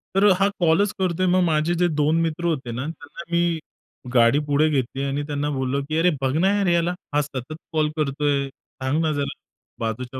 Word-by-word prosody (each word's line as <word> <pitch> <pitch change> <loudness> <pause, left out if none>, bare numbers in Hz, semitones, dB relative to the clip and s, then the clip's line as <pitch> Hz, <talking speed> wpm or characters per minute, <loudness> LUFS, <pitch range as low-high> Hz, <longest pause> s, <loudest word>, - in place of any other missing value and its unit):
तर 195 - +4
अ, 205 - +7
हा 195 - +4
कॉलच 175 +4 +3
करतोय. 185 -1 +1
मग 185 +1 +3
माझे 160 0 +1
जे 175 +1 +2
2 150 0 +1
मित्र 165 +1 -2
होते 135 -8 -1
ना, 125 +5 -4
त्यांना 165 +1 -9
मी 170 -1 +1 0.5
गाडी 120 +3 +5
पुढे 145 +2 +3
घेतली 135 -2 -1
आणि 140 +1 -1
त्यांना 145 0 -2
बोललो 130 +1 -1
की, 155 - 0
"अरे! 170 +2 +4
बघ 135 0 0
ना 180 +4 +3
यार 200 -2 +1
याला. 170 0 +2 0.2
हा 150 - +4
सतत 135 0 -6 0.2
कॉल 155 -1 +2
करतोय! 145 -1 0
सांग 135 +2 -4
ना 160 -1 +1
जरा 145 -1 -2 0.4
बाजूच्या 120 +3 -4
150 Hz, 200 wpm, -23 LUFS, 135-170 Hz, 0.5 s, अ